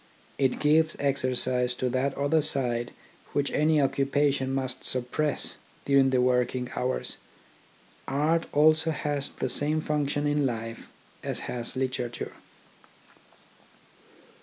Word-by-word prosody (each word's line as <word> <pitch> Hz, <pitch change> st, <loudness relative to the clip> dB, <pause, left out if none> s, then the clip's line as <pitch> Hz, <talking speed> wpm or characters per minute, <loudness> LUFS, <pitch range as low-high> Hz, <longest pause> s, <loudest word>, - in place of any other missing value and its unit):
It 135 Hz, -2 st, +2 dB
gives 155 Hz, +1 st, +3 dB
exercise 130 Hz, -2 st, +1 dB
to 130 Hz, -, -1 dB
that 130 Hz, +2 st, -1 dB
other 145 Hz, +3 st, +2 dB
side 120 Hz, -5 st, 0 dB, 0.4 s
which 145 Hz, 0 st, 0 dB
any 155 Hz, +1 st, +3 dB
occupation 135 Hz, 0 st, +1 dB
must 130 Hz, -1 st, -3 dB
suppress 130 Hz, +4 st, -1 dB, 0.3 s
during 140 Hz, -1 st, +4 dB
the 130 Hz, -1 st, +2 dB
working 125 Hz, 0 st, +1 dB
hours. 130 Hz, +1 st, -2 dB, 0.9 s
Art 155 Hz, +5 st, +1 dB
also 155 Hz, +2 st, +4 dB
has 145 Hz, -2 st, -2 dB
the -, -, -3 dB
same 150 Hz, +5 st, +1 dB
function 145 Hz, -1 st, -1 dB
in 145 Hz, 0 st, +1 dB
life 115 Hz, -3 st, -3 dB, 0.4 s
as -, -, -3 dB
has 120 Hz, -1 st, -4 dB
literature. 125 Hz, -2 st, -3 dB
135 Hz, 110 wpm, -27 LUFS, 125-150 Hz, 0.9 s, during